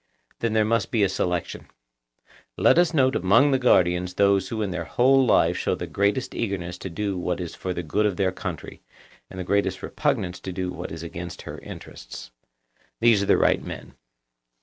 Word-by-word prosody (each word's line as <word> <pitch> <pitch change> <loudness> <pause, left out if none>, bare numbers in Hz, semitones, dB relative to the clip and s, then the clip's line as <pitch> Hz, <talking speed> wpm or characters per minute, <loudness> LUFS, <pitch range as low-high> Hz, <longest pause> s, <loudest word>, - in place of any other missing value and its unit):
Then 115 -2 -1
there 110 -1 +3
must 115 +2 0
be 115 -6 +1
a - - +4
selection. 90 -2 -3 0.9
Let - - +5
us 175 -2 +3
note 130 -5 +2
among 115 +11 +4
the 135 - +2
guardians 90 -6 +2
those 100 -1 +3
who 110 -2 -2
in 100 - -3
their 85 -1 -4
whole 135 +6 +4
life 125 - +3
show - - -1
the - - -5
greatest 105 +6 0
eagerness 90 -5 -3
to 95 - -6
do 100 +2 -3
what 90 0 -2
is 85 -2 -5
for 95 - -5
the 90 -1 -3
good 105 +7 +1
of 100 - -3
their 95 -2 +1
country, - - -7 0.5
and 95 - -9
the - - -2
greatest 100 +3 0
repugnance 90 0 -1
to 95 - -6
do 90 0 -3
what 90 0 -7
is 80 0 -7
against 85 +1 -7
her - - -8
interests. - - -10 0.7
Those 115 -3 +4
are 100 - -2
the - - +5
right - - +2
men. - - -8
95 Hz, 195 wpm, -24 LUFS, 90-115 Hz, 0.9 s, Let